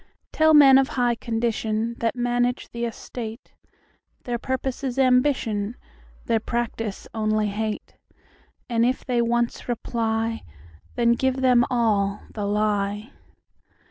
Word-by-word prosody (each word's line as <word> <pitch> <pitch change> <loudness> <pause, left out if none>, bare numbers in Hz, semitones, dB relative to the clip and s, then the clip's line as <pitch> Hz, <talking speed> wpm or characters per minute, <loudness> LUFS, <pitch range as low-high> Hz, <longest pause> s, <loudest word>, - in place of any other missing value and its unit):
Tell 315 0 +4
men 270 -2 +8
of 270 - +2
high 245 -1 +3
condition, 225 -1 -2
That 230 0 0
manage 245 0 0
the 235 0 -3
estate, 230 +1 -7 0.7
Their 240 -1 -3
purpose 260 +2 -3
is 260 -1 -3
ambition, 250 -5 +2 0.5
Their 230 -1 +2
practice 225 -2 -3
only 215 -1 0
hate:And 220 +2 -5
if 255 +2 0
they 245 -2 +1
once 235 +1 -1
reply, 225 -1 -1 0.5
Then 235 -1 +3
give 260 +2 0
them 250 -2 +5
all 210 -5 +1
the 205 -2 -3
lie. 210 +2 -1
235 Hz, 115 wpm, -24 LUFS, 220-250 Hz, 0.7 s, men